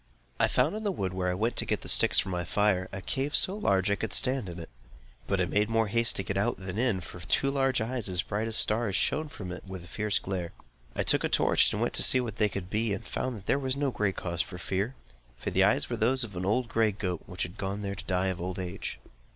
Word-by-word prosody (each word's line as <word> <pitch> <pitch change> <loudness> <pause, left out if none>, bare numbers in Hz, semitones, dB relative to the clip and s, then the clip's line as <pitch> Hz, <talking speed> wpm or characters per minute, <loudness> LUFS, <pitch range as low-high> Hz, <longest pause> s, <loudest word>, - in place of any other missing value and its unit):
I - - +4
found 140 +10 +1
in 215 - -5
the 205 - 0
wood 95 - -3
where 90 -1 -1
I 90 - -1
went 115 +5 -1
to - - +1
get - - -1
the - - -10
sticks - - +4
for - - +2
my 90 -1 -2
fire, 95 0 +1
a 95 -1 -6
cave 135 - -2
so 190 - +6
large 100 - +1
that 105 - +1
I - - +3
could - - -3
stand 130 -6 +1
in 85 - -8
it; 85 -1 -8 0.6
but 100 - 0
I 90 - +2
made 105 +4 +1
more 115 -2 +1
haste 115 +2 +3
to 95 - 0
get 95 - -3
out, 105 +4 0
than 95 +2 -5
in; 115 -7 +2
for 85 - -10
two 135 +11 0
large 135 -3 +1
eyes, 115 -2 -2
as 90 -1 +1
bright 105 +2 -2
as 115 - -1
stars, 110 -3 +4
shone 155 - +1
out - - -16
from 95 - -7
it 90 - -7
with 95 -2 -7
a - - -13
fierce 105 +2 0
glare. 90 -3 -4 0.4
I - - 0
took - - +4
a - - 0
torch, - - +3
and - - -1
went - - -1
to - - +2
see 130 - +6
what 115 -4 -4
they 105 -1 +3
could 95 -2 -5
be, 110 -1 0
and 115 - -9
found 130 -3 -3
that 100 - -13
there 140 - +2
was 130 -1 -2
no 140 -1 0
cause 95 -6 -1
for 90 - -6
fear; 100 +7 -2 0.4
for - - -4
the - - +3
eyes - - +3
were - - -3
those 130 +4 +2
of 105 -5 -5
an 90 +1 -3
old 115 +5 +1
gray 115 -2 +2
goat, 90 -4 -3
which 90 - -4
had 90 +5 -7
gone 100 +1 -3
there 100 0 -3
to 100 0 -9
die 95 0 0
of 90 -2 -4
old 90 +1 -4
age. 90 -7 -5
100 Hz, 280 wpm, -29 LUFS, 95-115 Hz, 0.6 s, so